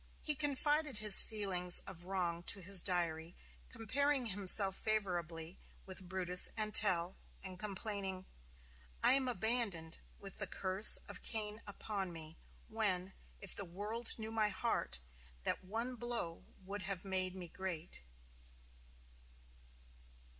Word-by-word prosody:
He 305 - +1
confided 295 -1 -1
his 210 -2 +8
feelings 185 -5 +2
of 175 -2 -10
wrong 180 -3 -3
to 200 - -1
his 190 0 +5
diary, 170 -2 -2 0.3
comparing 270 +3 -2
himself 195 -1 +7
favorably 175 -6 -4 0.3
with 185 -1 -8
Brutus 180 -1 +3
and 215 -1 -3
Tell, 185 -3 +1 0.3
and 185 -1 -9
complaining: 195 -2 -5 0.8
"I - - +6
am 265 -1 +1
abandoned, 220 -9 -2 0.2
with 195 -1 -11
the 205 - -4
curse 190 +3 +7
of - - -9
Cain 215 -1 -5
upon 200 -2 -6
me, 160 -1 -10 0.3
when, 195 -4 -3 0.3
if 195 - -5
the - - -4
world 210 +6 -5
knew 220 0 -6
my 215 -2 0
heart, 200 - -2 0.5
that - - -4
one 225 +6 -5
blow 235 -8 -5 0.2
would 200 +1 -6
have 190 -1 -5
made 185 -1 0
me 180 -2 -8
great." 175 - -6
195 Hz, 125 wpm, -35 LUFS, 180-220 Hz, 0.8 s, his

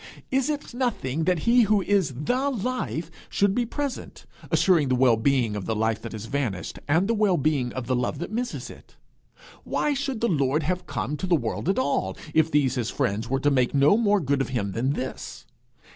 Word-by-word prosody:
Is 270 +2 +1
it 295 -4 -4
nothing 165 - -1
that 180 -3 +1
he 240 +1 +5
who 210 -3 +3
is 195 -8 +2
the 260 - +1
life 235 - -3 0.2
should 200 -1 +2
be 240 +2 0
present, 285 +2 -5 0.2
assuring 170 -7 +3
the 130 - +2
well 125 -2 +4
being 115 -1 +1
of 100 -3 -5
the 110 - 0
life 110 +1 0
that 115 - -7
has 110 0 -6
vanished, 120 -8 -3
and 165 +6 +2
the 230 - +2
well 205 -5 +2
being 140 -4 0
of 130 -2 -4
the 130 +1 0
love 125 +4 -1
that 170 +6 -5
misses 245 +3 -4
it? - - -16 0.7
Why 295 - 0
should 275 -3 -2
the 235 - +1
Lord 145 - +1
have 180 +4 -2
come 130 +11 -3
to 185 - -4
the 175 - +4
world 120 +4 -2
at 195 - +1
all, 260 0 0 0.2
if 160 0 +3
these 145 -4 +2
his 120 -3 -2
friends 115 -4 -1
were 135 +1 +1
to 145 - +3
take 130 -1 +1
no 140 +7 +5
more 210 -2 +3
good 140 -4 0
of 135 - -2
him 110 -6 -2
than 125 +7 0
this? 130 -2 -6
150 Hz, 215 wpm, -25 LUFS, 130-210 Hz, 0.7 s, he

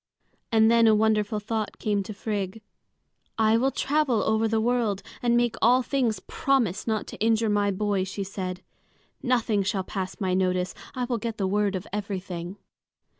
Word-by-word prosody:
And 220 0 +5
then 230 -1 +5
a 220 - +6
wonderful 215 -1 +2
thought 215 0 -3
came 205 -2 0
to 195 - -7
Frigg. 205 0 -4 0.7
"I 220 0 +4
will 255 +4 +3
travel 275 -5 +1
over 220 +1 +2
the 220 0 +1
world 225 -4 0 0.2
and 240 -1 +3
make 240 -1 +1
all 250 +2 +5
things 240 -7 0
promise 235 -3 0
not 220 -2 0
to - - -10
injure 225 0 +2
my 205 -1 +2
boy," 200 0 0
she 195 +1 -4
said. 185 -1 -5 0.6
"Nothing 235 -5 +1
shall 195 0 -1
pass 190 0 -5
my 185 -2 0
notice. 185 -1 +1 0.2
I 255 - -1
will 240 -2 -2
get 230 0 -4
the 195 - 0
word 200 +1 +1
of 185 +1 -4
everything." 190 -3 -4
215 Hz, 175 wpm, -26 LUFS, 195-230 Hz, 0.7 s, a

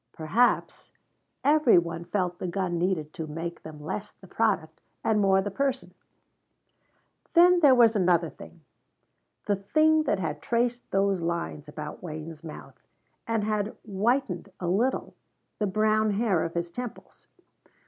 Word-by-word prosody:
Perhaps 185 +11 0 0.5
every 290 -6 +5
one 170 0 -1
felt 180 -2 -2
the - - -3
gun 175 -1 -2
need 170 -4 -1
to 160 - -5
make 165 +3 -5
them 155 -1 -10
less 195 +7 -5
the - - -17
product 190 -6 -1 0.2
and 215 -1 +2
more 195 -1 +4
the 205 - -4
person. 270 +4 -2 1.4
Then 355 +1 +7
there 285 -6 +6
was 235 -2 +5
another 175 -4 +2
thing. 170 - -14 0.8
The 205 - +1
thing 310 +10 +3
that - - +1
had 160 -5 -3
traced 240 +1 -1
those 195 -1 +1
lines 170 -3 -3
about 150 0 -7
Wayne's 155 -1 -7
mouth, 160 - -10 0.5
and 225 -2 0
had 210 0 -2
whitened, 225 +2 -1
a 180 - -4
little, 225 +9 0 0.5
the 210 - +1
brown 215 +2 +2
hair 205 -4 +1
of 165 - -6
his 170 0 -2
temples. 245 +3 -8
195 Hz, 145 wpm, -27 LUFS, 170-230 Hz, 1.4 s, Then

